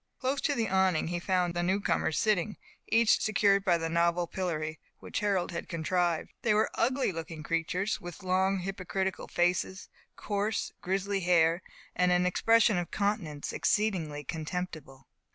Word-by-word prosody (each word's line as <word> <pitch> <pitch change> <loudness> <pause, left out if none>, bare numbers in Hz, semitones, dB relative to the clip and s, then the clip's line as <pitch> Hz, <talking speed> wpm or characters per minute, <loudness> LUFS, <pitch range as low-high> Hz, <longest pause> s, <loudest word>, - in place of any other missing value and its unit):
Close 270 +2 -1
to 285 - +1
the 230 -2 0
awning 190 -4 +2
he 175 0 -2
found 180 -1 0
the 175 - -1
new 185 +3 +1
comers 160 - 0
sitting, 210 -1 +1 0.3
each 225 0 +4
secured 200 -2 +3
by 180 -3 +3
the 165 0 -2
novel 170 +1 +2
pillory 160 -3 -3 0.2
which - - -4
Harold 200 -5 0
had 170 - -5
contrived. 170 0 -1
They 215 -3 +2
were 215 - +2
ugly 260 -1 +1
looking 165 -2 -7
creatures, 170 +6 -1
with 175 +1 -9
long, 190 +1 +1
hypocritical 190 0 -3
faces, 180 +2 0 0.3
coarse, 210 +1 -2
grizzly 195 +2 -1
hair, 170 -1 +3 0.3
and 180 0 +3
an 180 0 +3
expression 220 +2 +4
of 175 - -4
countenance 200 -8 -2
exceedingly 170 -9 0
contemptible. 155 -3 -5
180 Hz, 150 wpm, -30 LUFS, 170-200 Hz, 0.3 s, each